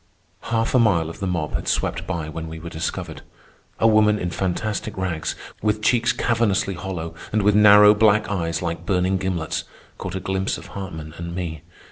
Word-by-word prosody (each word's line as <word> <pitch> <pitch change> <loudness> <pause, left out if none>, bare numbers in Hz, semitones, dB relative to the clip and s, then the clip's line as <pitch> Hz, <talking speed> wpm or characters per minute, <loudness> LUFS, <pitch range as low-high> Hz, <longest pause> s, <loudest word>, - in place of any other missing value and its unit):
Half 115 -1 0
a 130 - +5
mile 85 -8 +2
of - - -12
the 95 - -2
mob 85 -4 -2
had - - -3
swept - - -1
by 80 -3 -3
when 80 +1 -6
we 80 0 -7
were 85 +1 -8
discovered. 80 - -4 0.6
A - - +1
woman 105 -1 +4
in 90 -3 -3
fantastic 95 +4 -2
rags, 90 -4 -2 0.3
with 105 0 0
cheeks 120 +1 +3
cavernously 110 -4 +1
hollow 85 -3 -5 0.2
and 105 -1 +1
with 105 +1 +4
narrow 105 0 +8
black 105 0 +3
eyes 85 -4 -2
like 85 -1 -3
burning 95 0 +2
gimlets, 90 -5 -2 0.4
caught 95 0 -5
a - - -1
glimpse 95 +1 -1
of - - -11
Hartman 80 -6 -7
and 85 0 -5
me. 80 -4 -4
95 Hz, 185 wpm, -22 LUFS, 85-105 Hz, 0.6 s, narrow